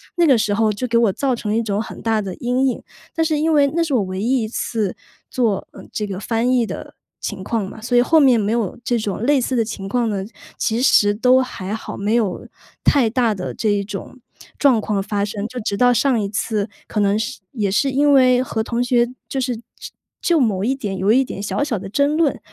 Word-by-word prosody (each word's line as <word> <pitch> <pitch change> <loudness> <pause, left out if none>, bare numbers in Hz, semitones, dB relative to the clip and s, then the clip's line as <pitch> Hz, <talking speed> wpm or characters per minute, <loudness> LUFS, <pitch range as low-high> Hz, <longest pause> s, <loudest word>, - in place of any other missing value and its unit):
那 345 -1 +3
个 260 -4 +5
时 215 -2 0
候 220 0 +2
就 210 +5 -3
给 235 - -2
我 230 -4 +4
造 265 -3 0
成 210 -2 -4
了 220 - +1
一 - - +2
种 205 0 -1
很 230 - -8
大 220 -1 +1
的 190 -2 -5
阴 250 +2 0
影。 250 - -2 0.3
但 325 -1 +1
是 310 -2 +1
因 320 +1 +2
为 285 -2 +5
那 335 - +2
是 305 -4 -2
我 225 - +3
唯 185 +1 -4
一 245 +1 +1
一 - - -2
次 215 -3 -2 0.4
做， 220 -6 0
呃， - - -11
这 210 - -2
个 190 -1 -5
翻 230 +3 0
译 240 -2 +3
的 - - -7 0.3
情 190 -3 -5
况 215 -2 -2
嘛， 220 - -11
所 245 +1 +1
以 - - +7
后 315 +5 +4
面 255 -5 +5
没 210 +1 0
有 230 -5 -1
这 240 - 0
种 205 -1 -3
类 280 0 +3
似 255 +1 -1
的 230 -2 +2
情 195 -3 -6
况 240 +1 +1
呢， 195 -2 -2 0.3
其 225 +1 0
实 205 -5 +5
都 255 +3 +4
还 205 -6 -5
好， - - -7
没 205 +3 -1
有 210 -6 -1 0.4
太 250 -6 +4
大 235 -2 +1
的 180 - -5
这 220 - -1
一 200 -1 +1
种 205 +5 -8 0.4
状 265 -6 +4
况 200 -2 -1
发 205 0 -1
生。 205 0 -4
就 250 0 -6
直 210 -2 -2
到 245 +1 +4
上 255 -2 +2
一 200 -1 -2
次， 210 0 -2 0.2
可 210 - -2
能 200 +1 +2
是 220 - -4
也 210 -6 -1
是 270 +7 +1
因 285 +2 +3
为 255 -2 +5
和 220 -3 -2
同 235 +1 -2
学 240 -1 +2 0.2
就 270 - -2
是 250 -2 -1
就 235 - -14 0.6
就 340 -3 +2
某 205 -6 +1
一 265 +4 +1
点 205 -7 -4
有 200 +3 +2
一 265 +3 +5
点 200 - -6
小 210 +7 -1
小 230 -9 -2
的 195 - -8
争 285 +6 +1
论， 320 -4 +1
230 Hz, 265 characters per minute, -20 LUFS, 205-255 Hz, 0.6 s, 以